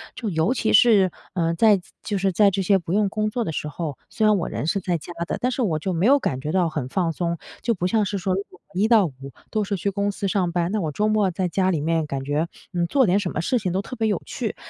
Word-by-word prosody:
就 225 - -3
尤 165 +7 +1
其 220 - 0
是， 200 -4 +6 0.2
嗯， 165 -2 0
在 215 +2 +5
自 180 - -15
就 205 -3 -2
是 190 0 +1
在 200 +3 +5
这 195 +1 -1
些 195 +1 +4
不 170 -1 -4
用 205 0 +2
工 215 +1 -1
作 235 +2 -2
的 185 - -3
时 150 - -3
候， 150 -2 -5
虽 220 - 0
然 215 -1 +5
我 170 - -2
人 155 - -3
是 195 - +1
在 180 -2 -1
家 165 - -10
的， - - -3
但 250 - +1
是 255 - -2
我 160 -7 0
就 185 +5 -2
没 170 +3 +1
有 280 +4 +6
感 130 - -2
觉 150 +3 -3
到 180 -1 +2
很 150 -5 -3
放 170 +2 0
松。 170 +1 -2 0.2
就 235 - +1
不 180 -2 -1
像 215 +1 +2
是 200 0 -2
说 185 0 -1
那 195 - -1
种 - - -18 0.2
一 205 +4 +2
到 225 -4 +5
五， 145 - -10 0.4
都 215 -1 0
是 200 0 -2
去 200 +2 -1
公 200 +1 -1
司 200 0 -3
上 185 -3 0
班， 175 0 0
那 215 - 0
我 155 - -2
周 210 +8 0
末 215 -3 +2
在 185 +2 -1
家 190 +1 +1
里 160 -5 -1
面 165 0 0
感 135 -2 -3
觉， 145 +4 -1 0.3
嗯， 175 -1 0
做 270 +4 +3
点 190 0 +3
什 190 -3 -3
么 - - -2
事 245 +8 +1
情 185 -4 -2
都 190 - 0
特 255 - -8
别 225 -1 0
有 210 - 0
趣。 - - -4
190 Hz, 320 characters per minute, -23 LUFS, 170-210 Hz, 0.4 s, 是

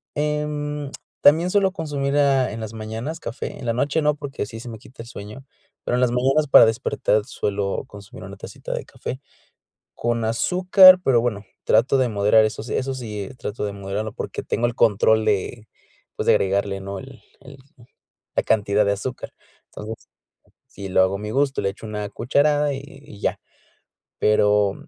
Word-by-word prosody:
em, 150 -1 -2 0.3
también 165 +5 +5
suelo 195 -2 +3
consumir, 145 -4 -2
ah, 135 -5 +3
en 115 - -6
las 110 0 -6
mañanas 110 +8 -5
café, 120 +4 -6
en 125 - -8
la - - +2
noche 140 +6 0
no, 150 0 +2
porque 140 -7 -5
sí 115 +2 -9
se 120 - -10
me 110 - -7
quita 115 -1 -12
el - - -14
sueño, 105 +7 -10 0.4
pero 120 - 0
en 125 - +1
las 125 -1 +3
mañanas, 135 +5 +2
para - - +9
despertar, 110 -2 0
suelo 100 -1 -2
consumir 100 -1 -12
una - - -10
tacita - - -7
de - - -4
café, 130 - -7 0.8
con 120 -1 -1
azúcar, 185 - +6
pero 120 -3 +3
bueno, 105 -4 -2 0.2
trato 115 +5 +3
de 130 -2 +2
moderar 105 +1 +4
esos 110 +2 -5
eso 135 0 -1
sí, 105 -5 -6
y - - -16
trato 105 -2 -5
de 100 - -4
moderarlo 100 +2 -4
porque - - -5
tengo 120 +2 -1
el 120 - -3
control 110 +1 +3
de, 105 +2 -1 0.5
pues, - - -3
de - - +6
agregarle, 100 0 0
¿no?, 100 0 -6
el 135 0 -12 0.2
el 135 +1 -13 0.8
la - - +2
cantidad 105 -1 +2
de 100 - +2
azúcar, 125 +5 -6 0.4
entonces, 110 +1 -8 0.6
si 100 -1 -9
lo 95 - +3
hago 95 +1 0
a - - -11
mi 105 +1 -5
gusto, 140 +2 +1
le - - 0
echo 100 +3 -10
una 105 -1 -4
cucharada, 145 +5 +1
y 135 - -5
y 145 -8 -14
ya, - - -1 0.8
pero, 105 -1 +3
115 Hz, 185 wpm, -22 LUFS, 105-140 Hz, 0.8 s, para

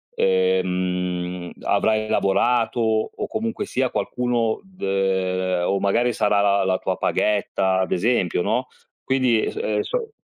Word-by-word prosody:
ehm, 90 -1 0
avrai 110 0 +1
lavorato 120 +5 +1
o, 110 -1 0
comunque 225 +1 -3
sia, 130 -1 -1
qualcuno 120 -3 -1
d 190 -1 -21
ehm, 95 -2 0
o, 100 - +1
magari, 120 +5 +2
sarà 105 -1 +2
la 100 0 +3
la 95 0 +1
tua - - -2
paghetta, 95 -2 +1
ad 95 - -1
esempio, 90 -4 +1
no, - - 0 0.4
quindi, 130 -4 +2
s - - -9
ehm, 460 +3 -1
s - - -6
so 480 -3 -2
100 Hz, 140 wpm, -22 LUFS, 95-120 Hz, 0.4 s, la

